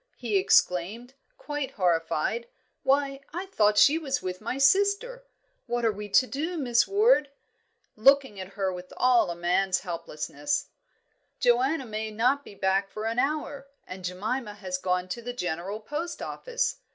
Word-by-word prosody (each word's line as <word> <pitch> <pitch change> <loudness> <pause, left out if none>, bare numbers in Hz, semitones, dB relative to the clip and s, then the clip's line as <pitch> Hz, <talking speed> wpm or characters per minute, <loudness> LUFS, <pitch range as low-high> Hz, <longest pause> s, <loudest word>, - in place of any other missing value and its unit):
he 230 -4 -2
exclaimed, 195 +6 +2 0.2
quite 295 - -4
horrified. 180 +5 0 0.3
"Why, 275 0 +1 0.2
I 360 +2 -3
thought 210 - +2
she 295 +9 +6
was 280 -3 -1
with 185 +1 -5
my 235 +4 -3
sister! 405 - +2 0.4
What 240 0 -1
are 225 - +4
we 210 0 -7
to 255 - +5
do, 315 +7 -3
Miss 245 -5 +2
Ward?" 410 - +4 0.7
looking 265 -2 +4
at 190 +1 -8
her 195 -2 -1
with 180 0 -9
all 240 -6 +4
a 170 - -3
man's 180 +2 +1
helplessness. 180 - -3 0.7
"Joanna 260 +4 +2
may 220 -1 -4
not 250 +6 +1
be 205 - -13
back 195 0 +1
for 215 +2 -6
an 230 +2 -1
hour, 285 -1 -2 0.2
and 185 0 -9
Jemima 210 +5 -3
has 185 -3 -4
gone 180 0 -1
to 235 +6 -4
the 245 +1 -5
General 180 0 -3
Post 295 +10 -5
Office. - - -2
235 Hz, 155 wpm, -27 LUFS, 190-280 Hz, 0.7 s, she